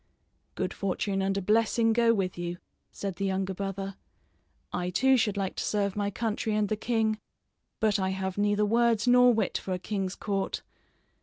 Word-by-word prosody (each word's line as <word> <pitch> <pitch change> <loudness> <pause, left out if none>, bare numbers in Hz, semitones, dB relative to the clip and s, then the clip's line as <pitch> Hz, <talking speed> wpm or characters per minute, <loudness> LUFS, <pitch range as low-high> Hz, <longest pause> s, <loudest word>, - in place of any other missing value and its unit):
"Good - - -2
fortune 195 0 -1
and 195 0 0
a 195 - -2
blessing 225 +2 +3
go 230 0 +4
with 195 -5 0
you," 175 0 -4 0.3
said 195 -3 -5
the 195 - -1
younger 190 0 -1
brother. 195 0 -4 0.8
"I, 180 0 -1
too, 260 +9 +4
should 210 -4 +1
like 195 -2 -2
to - - -1
serve 200 -2 0
my 205 -1 0
country 220 +1 -2
and 210 -1 +1
the 215 - +1
king, 220 -1 0 0.6
but 215 -2 +2
I 190 0 0
have 190 -1 -3
neither 205 +1 +2
words 230 0 +2
nor 250 0 +7
wit 220 -5 0
for 190 - -4
a - - -1
king's 190 0 -3
court. 195 -2 -2
205 Hz, 180 wpm, -28 LUFS, 190-220 Hz, 0.8 s, nor